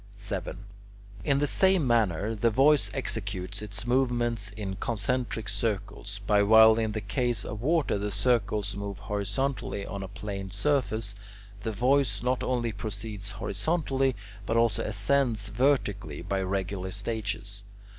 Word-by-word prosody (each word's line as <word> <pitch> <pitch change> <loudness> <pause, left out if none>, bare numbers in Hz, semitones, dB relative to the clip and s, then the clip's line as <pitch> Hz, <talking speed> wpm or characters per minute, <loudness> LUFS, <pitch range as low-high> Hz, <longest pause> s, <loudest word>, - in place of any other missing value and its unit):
7. 100 -3 -4 0.7
In 140 -2 +2
the 145 - +2
same 190 +1 +3
manner 110 -4 +2
the 115 +2 +2
voice 140 +6 +4
executes 100 -6 -3
its 105 +1 -3
movements 120 -4 +1
in 100 -2 -5
concentric 115 0 -1
circles; 105 -2 -3
but 100 -1 +4
while 110 +1 +8
in 110 -1 0
the 110 - -2
case 120 +4 -1
of 105 0 -5
water 150 -6 +2
the 105 +1 -2
circles 105 -2 +1
move 100 -1 -5
horizontally 105 +1 -2
on 100 - -5
a 95 - -5
plane 100 0 -6
surface, 110 -2 0 0.5
the 110 - -2
voice 125 -1 +2
not 125 0 +1
only 120 -2 0
proceeds 105 -1 -5
horizontally, 135 - 0 0.3
but 115 - +1
also 115 -3 +2
ascends 105 0 +1
vertically 105 - 0
by 95 +2 -1
regular 95 0 -2
stages. 105 -1 -4
110 Hz, 135 wpm, -28 LUFS, 100-125 Hz, 0.7 s, while